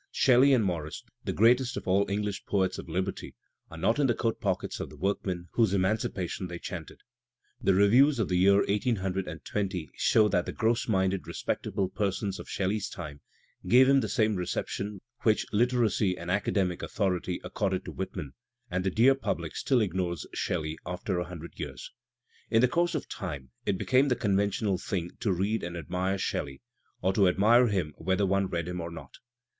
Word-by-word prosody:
Shelley 130 Hz, +2 st, +5 dB
and 120 Hz, -6 st, +4 dB
Morris, 80 Hz, -4 st, -3 dB, 0.2 s
the -, -, -1 dB
greatest 120 Hz, +3 st, +3 dB
of -, -, -6 dB
all 100 Hz, +2 st, +2 dB
English 105 Hz, 0 st, -2 dB
poets 95 Hz, -2 st, 0 dB
of -, -, -9 dB
liberty, 95 Hz, +4 st, -3 dB, 0.3 s
are 80 Hz, -, -10 dB
not 115 Hz, -, +1 dB
in 140 Hz, -, +4 dB
the 120 Hz, -, +2 dB
coat 115 Hz, -1 st, -1 dB
pockets 95 Hz, -3 st, -2 dB
of -, -, -4 dB
the -, -, -13 dB
workmen 90 Hz, -3 st, -2 dB
whose 110 Hz, -5 st, +2 dB
emancipation 95 Hz, -2 st, -1 dB
they 85 Hz, 0 st, -6 dB
chanted. -, -, -7 dB, 0.6 s
The 95 Hz, -, +3 dB
reviews 125 Hz, +9 st, +5 dB
of 110 Hz, -5 st, 0 dB
the 90 Hz, -, 0 dB
year 100 Hz, +2 st, +5 dB
1820 95 Hz, -, -2 dB
show 110 Hz, -1 st, +4 dB
that 90 Hz, -3 st, +1 dB
the -, -, -4 dB
gross 115 Hz, +2 st, +1 dB
minded 95 Hz, -3 st, 0 dB
respectable 95 Hz, -1 st, -2 dB
persons 100 Hz, 0 st, -2 dB
of -, -, -9 dB
Shelley's 100 Hz, +2 st, -1 dB
time 75 Hz, -5 st, -8 dB, 0.5 s
gave 130 Hz, +2 st, +7 dB
him 135 Hz, 0 st, +5 dB
the -, -, -2 dB
same 110 Hz, -4 st, +2 dB
reception 95 Hz, +2 st, -3 dB, 0.2 s
which 110 Hz, -2 st, +2 dB
Literary 110 Hz, -4 st, +2 dB
and 85 Hz, 0 st, -4 dB
Academic 95 Hz, -2 st, 0 dB
Authority 90 Hz, -3 st, -1 dB
accorded 95 Hz, -3 st, -2 dB
to -, -, -6 dB
Whitman, 90 Hz, -6 st, -5 dB, 0.4 s
and 90 Hz, +1 st, -1 dB
the 95 Hz, -, +1 dB
dear 120 Hz, +8 st, +5 dB
public 135 Hz, -, -3 dB
still 130 Hz, -4 st, +2 dB
ignores 90 Hz, -3 st, -2 dB
Shelley 80 Hz, -2 st, -2 dB
after 90 Hz, +1 st, -3 dB
a 90 Hz, -, -2 dB
hundred 85 Hz, -1 st, -10 dB
years. 70 Hz, -5 st, -6 dB, 0.6 s
In 115 Hz, -, +4 dB
the 125 Hz, -, +5 dB
course 170 Hz, +5 st, +1 dB
of 150 Hz, -, -3 dB
time 70 Hz, -, -6 dB, 0.2 s
it 95 Hz, -, +1 dB
became 130 Hz, +7 st, +3 dB
the 125 Hz, -, +2 dB
conventional 100 Hz, -2 st, 0 dB
thing 90 Hz, -4 st, -3 dB
to 110 Hz, -, 0 dB
read 100 Hz, +5 st, 0 dB
and 85 Hz, 0 st, -5 dB
admire 90 Hz, +4 st, -2 dB
Shelley, 70 Hz, -6 st, -3 dB, 0.4 s
or 95 Hz, +1 st, +2 dB
to 100 Hz, -1 st, +4 dB
admire 115 Hz, +7 st, +5 dB
him 90 Hz, -8 st, -1 dB
whether 95 Hz, +2 st, +1 dB
one 100 Hz, 0 st, +1 dB
read 85 Hz, -2 st, -3 dB
him 90 Hz, 0 st, -4 dB
or 85 Hz, -, -5 dB
not. 85 Hz, -, -10 dB
95 Hz, 180 wpm, -29 LUFS, 90-110 Hz, 0.6 s, gave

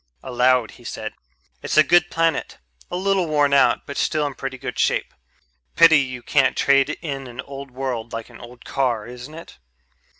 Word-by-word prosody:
Aloud 125 Hz, -2 st, +2 dB
he 120 Hz, -, -17 dB
said, 110 Hz, -2 st, -6 dB, 0.5 s
"It's -, -, -2 dB
a 155 Hz, -, +8 dB
good 175 Hz, +1 st, +4 dB
planet, 165 Hz, 0 st, -1 dB, 0.3 s
a -, -, -4 dB
little 190 Hz, -1 st, +1 dB
worn 145 Hz, -2 st, +2 dB
out 140 Hz, -, +3 dB
but 140 Hz, -, -7 dB
still 155 Hz, -1 st, 0 dB
in 145 Hz, -, -3 dB
pretty 135 Hz, 0 st, -6 dB
good 125 Hz, -1 st, -6 dB
shape. -, -, 0 dB, 0.6 s
Pity 165 Hz, -2 st, +7 dB
you 130 Hz, -3 st, -4 dB
can't 135 Hz, -3 st, +2 dB
trade 140 Hz, -1 st, +3 dB
in 135 Hz, -4 st, -5 dB
an 120 Hz, 0 st, -12 dB
old 140 Hz, +1 st, -9 dB
world 125 Hz, -3 st, -4 dB
like 115 Hz, 0 st, -6 dB
an -, -, -14 dB
old 120 Hz, 0 st, -13 dB
car, 125 Hz, -6 st, -1 dB
isn't 125 Hz, +5 st, -10 dB
it?" 165 Hz, -, -12 dB
135 Hz, 180 wpm, -22 LUFS, 125-155 Hz, 0.6 s, a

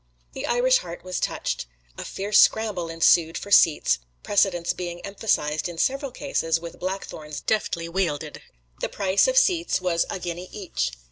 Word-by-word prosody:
The -, -, -5 dB
Irish 255 Hz, +2 st, +3 dB
heart 170 Hz, -1 st, -9 dB
was 185 Hz, 0 st, -3 dB
touched. -, -, -2 dB, 0.3 s
A -, -, -6 dB
fierce 205 Hz, +2 st, +1 dB
scramble 205 Hz, -6 st, +3 dB
ensued 165 Hz, 0 st, +3 dB
for 200 Hz, -, -8 dB
seats, 150 Hz, -, +5 dB, 0.2 s
precedence 185 Hz, -4 st, +1 dB
being 175 Hz, -1 st, -5 dB
emphasized 175 Hz, -7 st, -1 dB
in 170 Hz, -, -8 dB
several 275 Hz, -, 0 dB
cases 165 Hz, -, -1 dB
with 170 Hz, 0 st, -9 dB
blackthorns 170 Hz, -5 st, -5 dB
deftly 170 Hz, -6 st, -1 dB
wielded. 165 Hz, -4 st, -2 dB, 0.4 s
The -, -, -2 dB
price 195 Hz, -, +2 dB
of -, -, +1 dB
seats 360 Hz, -9 st, +3 dB
was 175 Hz, -2 st, 0 dB
a -, -, -3 dB
guinea 175 Hz, 0 st, -6 dB
each. 65 Hz, -, -3 dB
180 Hz, 155 wpm, -24 LUFS, 165-205 Hz, 0.4 s, seats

